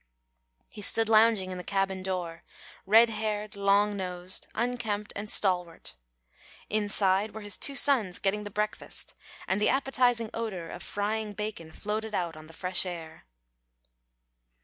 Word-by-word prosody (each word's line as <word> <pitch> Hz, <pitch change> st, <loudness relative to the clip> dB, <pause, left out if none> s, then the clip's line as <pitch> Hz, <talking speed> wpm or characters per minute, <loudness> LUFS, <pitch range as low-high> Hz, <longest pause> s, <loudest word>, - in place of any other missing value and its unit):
He 210 Hz, -, -11 dB
stood 225 Hz, +2 st, +4 dB
lounging 215 Hz, -4 st, +4 dB
in 180 Hz, -, -5 dB
the -, -, -6 dB
cabin 195 Hz, -1 st, -1 dB
door 180 Hz, -3 st, -4 dB, 0.5 s
red 225 Hz, +3 st, +6 dB
haired, 215 Hz, -1 st, -3 dB
long 200 Hz, +1 st, +3 dB
nosed, 180 Hz, -1 st, -3 dB
unkempt, 225 Hz, -3 st, -2 dB
and 210 Hz, +1 st, -5 dB
stalwart. 180 Hz, -5 st, +1 dB, 0.8 s
Inside 205 Hz, -1 st, +1 dB
were 220 Hz, -, -6 dB
his 205 Hz, -2 st, +2 dB
two 280 Hz, -, -2 dB
sons 235 Hz, -11 st, +4 dB
getting 205 Hz, +1 st, -1 dB
the 205 Hz, -, -6 dB
breakfast, 210 Hz, +1 st, -3 dB, 0.3 s
and 190 Hz, +2 st, 0 dB
the -, -, +4 dB
appetising 250 Hz, -4 st, +1 dB
odour 195 Hz, -8 st, -4 dB
of 175 Hz, -, -8 dB
frying 210 Hz, +1 st, -2 dB
bacon 205 Hz, -6 st, -5 dB
floated 215 Hz, +3 st, -4 dB
out 170 Hz, -3 st, -2 dB
on 155 Hz, 0 st, -12 dB
the 165 Hz, -, -14 dB
fresh 180 Hz, +2 st, +1 dB
air. 165 Hz, -3 st, -7 dB
205 Hz, 145 wpm, -28 LUFS, 185-220 Hz, 0.8 s, red